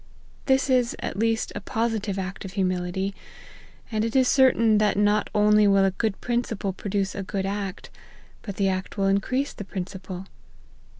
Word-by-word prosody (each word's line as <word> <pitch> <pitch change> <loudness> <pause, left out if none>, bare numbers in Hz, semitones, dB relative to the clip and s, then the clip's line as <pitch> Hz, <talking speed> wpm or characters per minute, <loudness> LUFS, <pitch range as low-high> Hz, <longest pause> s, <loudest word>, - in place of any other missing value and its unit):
This 265 0 +3
is 250 -3 +2
at - - -4
least 225 0 +1
a - - -4
positive 220 -2 -1
act 190 0 -4
of 190 -1 -8
humility, 185 0 -1 0.8
and 215 -1 0
it 230 +2 -2
is 260 -1 +5
certain 230 -6 +4
that 210 -2 +2
not 205 +1 +2
only 210 0 +5
will 195 -1 +5
a 195 - +2
good 205 +1 -2
principle 235 -5 -2
produce 195 0 -2
a - - -4
good 195 0 -3
act, 195 -1 -4 0.5
but 200 -3 -6
the 195 -1 +1
act 185 +1 -3
will 195 - +1
increase 255 +8 0
the - - -7
principle. 185 -1 -6
205 Hz, 170 wpm, -25 LUFS, 195-225 Hz, 0.8 s, is